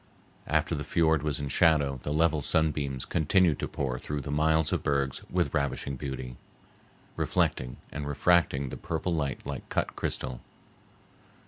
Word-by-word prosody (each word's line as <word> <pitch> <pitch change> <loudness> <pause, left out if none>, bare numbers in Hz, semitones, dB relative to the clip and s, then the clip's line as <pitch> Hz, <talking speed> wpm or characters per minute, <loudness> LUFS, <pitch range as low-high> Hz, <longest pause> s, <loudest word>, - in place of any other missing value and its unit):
After 80 +2 +1
the 75 -2 -2
fiord 80 0 +2
was 75 -2 -1
in 70 -1 -3
shadow 70 -4 +3
the 75 - -3
level 80 0 +2
sunbeams 70 -4 0
continued 85 0 +3
to - - -2
pour 65 -2 -3
through 75 +2 -4
the 70 - -5
miles 80 +1 +2
of - - 0
bergs 70 -2 0
with - - 0
ravishing 70 0 -1
beauty, 65 -2 -6 0.8
reflecting 60 -1 0
and 70 0 -4
refracting 75 -2 +2
the - - -6
purple 90 - -2
light 70 -4 -2
like 70 -1 -6
cut - - -1
crystal. 65 -2 -3
75 Hz, 150 wpm, -29 LUFS, 70-80 Hz, 0.8 s, shadow